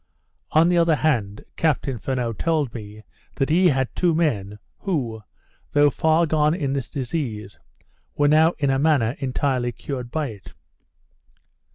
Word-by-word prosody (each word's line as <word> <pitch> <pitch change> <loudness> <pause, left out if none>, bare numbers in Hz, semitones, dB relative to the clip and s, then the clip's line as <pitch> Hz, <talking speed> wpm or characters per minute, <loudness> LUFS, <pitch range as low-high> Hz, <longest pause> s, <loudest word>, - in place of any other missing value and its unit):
On 160 +2 +5
the 175 -1 +3
other 165 -2 +4
hand, 115 -11 -1
Captain 140 -5 0
Furneaux 125 -2 -2
told 150 -1 -1
me, 105 -1 -9 0.3
that 135 +1 0
he 180 +3 +5
had 130 -5 0
two 175 -3 +2
men, 105 - -1 0.2
who, 125 - -2 0.5
though 145 0 +5
far 160 +5 +2
gone 155 0 +2
in 140 -7 -2
this 135 -4 -3
disease, 120 - -4 0.6
were 145 - +3
now 160 +3 +5
in 140 -3 +1
a 135 - +1
manner 140 -6 +2
entirely 130 -2 -1
cured 125 0 -6
by 150 +1 -2
it. 100 -4 -12
140 Hz, 150 wpm, -23 LUFS, 120-160 Hz, 0.6 s, On